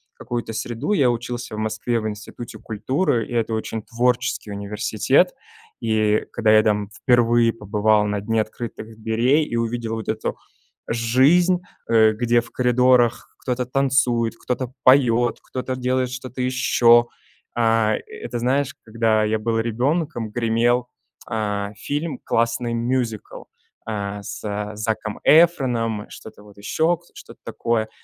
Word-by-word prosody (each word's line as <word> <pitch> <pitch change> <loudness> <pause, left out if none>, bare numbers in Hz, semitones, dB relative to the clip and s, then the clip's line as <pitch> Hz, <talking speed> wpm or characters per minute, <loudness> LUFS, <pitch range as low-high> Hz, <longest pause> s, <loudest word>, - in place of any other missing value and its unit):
какую-то 120 -1 -5
среду. 120 - -2
Я 135 -10 +3
учился 120 -1 -5
в - - -5
Москве 110 +2 -1
в 110 - -3
Институте 110 +2 -8
культуры, 115 - -1
и - - -8
это 115 -1 0
очень 110 0 -3
творческий 125 -2 -1
университет. 100 +1 +1 0.5
И 110 -2 +1
когда 110 -2 +2
я 110 0 +6
там 105 -2 0
впервые 120 -2 +4
побывал 105 0 +1
на 105 -1 -2
дне 110 +2 +1
открытых 110 0 -7
дверей 120 +8 +2
и 120 - -5
увидел 115 -1 -2
вот 110 - -6
эту 110 0 -2 0.5
жизнь, 135 +11 +3 0.3
э, 110 -1 +5
где 120 +1 +2
в 115 - -15
коридорах 125 -1 +3
кто-то 125 -1 -2
танцует, 125 -3 +1
кто-то 125 0 -3
поёт, 120 -3 +4
кто-то 130 0 -4
делает 130 0 0
что-то 130 0 -6
ещё 120 -2 +4 0.5
Э, 115 -2 +2
это 120 0 -6
знаешь, 135 +3 0
когда 110 -1 +1
я 110 +1 +1
был 115 +1 -1
ребенком, 120 +2 -1
гремел, 120 +2 +1 0.4
э, 105 -3 -2
фильм 145 +6 -3
классный, 115 +1 0
мюзикл, 115 -2 -2 0.5
э, 100 -1 -4
с 105 0 -5
Заком 110 0 -3
Эфроном, 125 -10 +3
что-то 105 -1 -12
вот 105 -1 -16
ещё, 160 +12 +1
к 175 - -27
что-то - - -13
такое. 110 -2 -1
115 Hz, 135 wpm, -22 LUFS, 110-125 Hz, 0.5 s, я